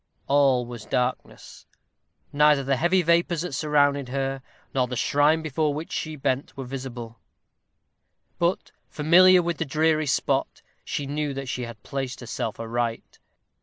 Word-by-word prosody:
All 135 Hz, -3 st, +3 dB
was 120 Hz, -2 st, -9 dB
darkness. 125 Hz, 0 st, -3 dB, 0.7 s
Neither 150 Hz, -1 st, +4 dB
the 135 Hz, +1 st, +1 dB
heavy 175 Hz, +6 st, +2 dB
vapors 170 Hz, 0 st, +2 dB
that 180 Hz, -, -5 dB
surrounded 145 Hz, -2 st, +1 dB
her, 135 Hz, 0 st, -2 dB, 0.3 s
nor 130 Hz, -2 st, +1 dB
the 125 Hz, -, -5 dB
shrine 150 Hz, +5 st, +2 dB
before 155 Hz, 0 st, -1 dB
which 155 Hz, +2 st, -6 dB
she 155 Hz, -1 st, -3 dB
bent, 135 Hz, -1 st, -2 dB
were 135 Hz, -, -4 dB
visible; 125 Hz, -3 st, -7 dB, 1.2 s
but, 175 Hz, +2 st, 0 dB, 0.2 s
familiar 180 Hz, +4 st, +5 dB
with 170 Hz, -2 st, -2 dB
the -, -, +1 dB
dreary 155 Hz, +1 st, +1 dB
spot, 130 Hz, -, -1 dB, 0.2 s
she 145 Hz, -, -3 dB
knew 145 Hz, 0 st, -3 dB
that 135 Hz, -1 st, -5 dB
she 125 Hz, 0 st, -3 dB
had 115 Hz, -2 st, -11 dB
placed 135 Hz, -2 st, -4 dB
herself 115 Hz, -2 st, -4 dB
aright. 115 Hz, 0 st, -3 dB
140 Hz, 145 wpm, -25 LUFS, 125-155 Hz, 1.2 s, familiar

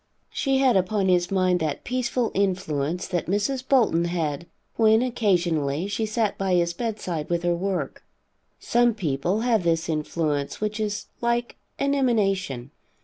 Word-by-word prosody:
She 270 Hz, -1 st, +1 dB
had 265 Hz, -2 st, +4 dB
upon 190 Hz, +1 st, +1 dB
his 175 Hz, -1 st, +2 dB
mind 185 Hz, -2 st, +2 dB
that 155 Hz, -3 st, -2 dB
peaceful 245 Hz, -1 st, -1 dB
influence 180 Hz, -4 st, -1 dB
that 175 Hz, -2 st, -2 dB
Mrs. 210 Hz, +8 st, 0 dB
Bolton 220 Hz, -11 st, +3 dB
had 170 Hz, -2 st, -2 dB, 0.3 s
when, 220 Hz, +1 st, +4 dB
occasionally, 175 Hz, -, 0 dB
she 205 Hz, +2 st, -2 dB
sat 215 Hz, -1 st, -1 dB
by 190 Hz, -2 st, +1 dB
his 170 Hz, -1 st, +1 dB
bedside 185 Hz, -8 st, -3 dB
with 170 Hz, 0 st, 0 dB
her 175 Hz, 0 st, +2 dB
work. 175 Hz, -5 st, -3 dB, 0.6 s
Some 240 Hz, -1 st, +2 dB
people 175 Hz, +2 st, -1 dB
have 230 Hz, -3 st, +2 dB
this 165 Hz, -1 st, 0 dB
influence, 150 Hz, -2 st, -2 dB
which 215 Hz, +1 st, -2 dB
is 210 Hz, -1 st, -2 dB, 0.2 s
like 235 Hz, 0 st, 0 dB, 0.2 s
an 280 Hz, 0 st, +1 dB
emanation. 195 Hz, -, 0 dB
190 Hz, 145 wpm, -25 LUFS, 170-225 Hz, 0.6 s, had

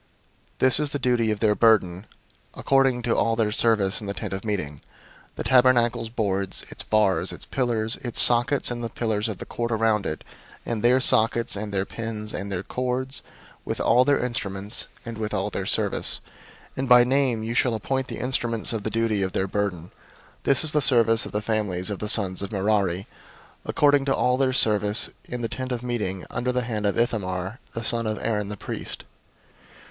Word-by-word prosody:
004:031 -, -, -38 dB
This 130 Hz, +1 st, +4 dB
is 150 Hz, -1 st, +1 dB
the 145 Hz, -, -3 dB
charge 125 Hz, -4 st, +1 dB
of 105 Hz, -1 st, -1 dB
their 110 Hz, -2 st, +3 dB
burden, 105 Hz, -4 st, +2 dB, 0.5 s
according 135 Hz, -3 st, +1 dB
to 115 Hz, -, 0 dB
all 115 Hz, -, +1 dB
their 110 Hz, -2 st, 0 dB
service 105 Hz, -3 st, +1 dB
in 105 Hz, -, -7 dB
the 100 Hz, -, -4 dB
Tent -, -, -5 dB
of 95 Hz, -, -5 dB
Meeting: 90 Hz, -10 st, -4 dB, 0.5 s
the -, -, -5 dB
tabernacle's 125 Hz, -3 st, +3 dB
boards, 100 Hz, -4 st, -2 dB
its -, -, -9 dB
bars, 105 Hz, -3 st, +1 dB
its -, -, -9 dB
pillars, 115 Hz, -3 st, -1 dB
its 120 Hz, -3 st, -3 dB
sockets, 120 Hz, +3 st, +7 dB
004:032 -, -, -5 dB
and 120 Hz, 0 st, -6 dB
the 115 Hz, -, -3 dB
pillars 110 Hz, -2 st, -2 dB
of 105 Hz, -, -5 dB
the -, -, -8 dB
court 120 Hz, 0 st, -4 dB
around 110 Hz, -2 st, +1 dB
it, 75 Hz, -, -5 dB, 0.4 s
and 115 Hz, -3 st, -3 dB
their 125 Hz, +3 st, +4 dB
sockets, 115 Hz, -2 st, +3 dB
and 105 Hz, +1 st, -5 dB
their 95 Hz, -1 st, -1 dB
pins, 110 Hz, -1 st, -5 dB
and 100 Hz, +1 st, -5 dB
their 90 Hz, -1 st, -3 dB
cords, 130 Hz, +4 st, -3 dB, 0.4 s
with -, -, -4 dB
all 125 Hz, -, +4 dB
their 140 Hz, +2 st, +2 dB
instruments, 105 Hz, -4 st, -2 dB, 0.2 s
and 115 Hz, -1 st, -7 dB
with 105 Hz, -1 st, -3 dB
all 100 Hz, +1 st, -2 dB
their 95 Hz, -1 st, -4 dB
service: -, -, 0 dB, 0.6 s
and 135 Hz, -1 st, -3 dB
by 125 Hz, 0 st, +8 dB
name 130 Hz, -3 st, 0 dB
you 115 Hz, +1 st, -3 dB
shall 120 Hz, -1 st, +1 dB
appoint 130 Hz, +4 st, -2 dB
the -, -, -6 dB
instruments 120 Hz, -3 st, 0 dB
of 110 Hz, -, -3 dB
the 110 Hz, -, -3 dB
charge 115 Hz, 0 st, -1 dB
of 95 Hz, -1 st, -2 dB
their 95 Hz, -, 0 dB
burden. 95 Hz, -4 st, -3 dB, 0.5 s
004:033 -, -, -36 dB
This 135 Hz, -3 st, +4 dB
is 155 Hz, -, +2 dB
the 150 Hz, -, +1 dB
service 115 Hz, -4 st, +3 dB
of -, -, -10 dB
the 105 Hz, -, -2 dB
families 105 Hz, -3 st, -1 dB
of 100 Hz, -, -5 dB
the 105 Hz, -, -4 dB
sons 95 Hz, -5 st, +2 dB
of 100 Hz, -, -5 dB
Merari, 100 Hz, -2 st, 0 dB, 0.6 s
according 145 Hz, -1 st, +2 dB
to 135 Hz, -, +1 dB
all 125 Hz, 0 st, +1 dB
their 135 Hz, -1 st, +1 dB
service, 105 Hz, -3 st, +2 dB
in 125 Hz, 0 st, -6 dB
the -, -, 0 dB
Tent 130 Hz, +2 st, -5 dB
of 125 Hz, -1 st, -3 dB
Meeting, 105 Hz, -7 st, -3 dB
under 125 Hz, +1 st, -2 dB
the 125 Hz, 0 st, -1 dB
hand 110 Hz, -3 st, -2 dB
of 100 Hz, -, -1 dB
Ithamar 100 Hz, -2 st, -2 dB, 0.2 s
the 115 Hz, -, -4 dB
son 115 Hz, 0 st, -1 dB
of 110 Hz, 0 st, -2 dB
Aaron 105 Hz, -3 st, -2 dB
the 105 Hz, -, -6 dB
priest." -, -, -6 dB
115 Hz, 205 wpm, -24 LUFS, 105-125 Hz, 0.6 s, by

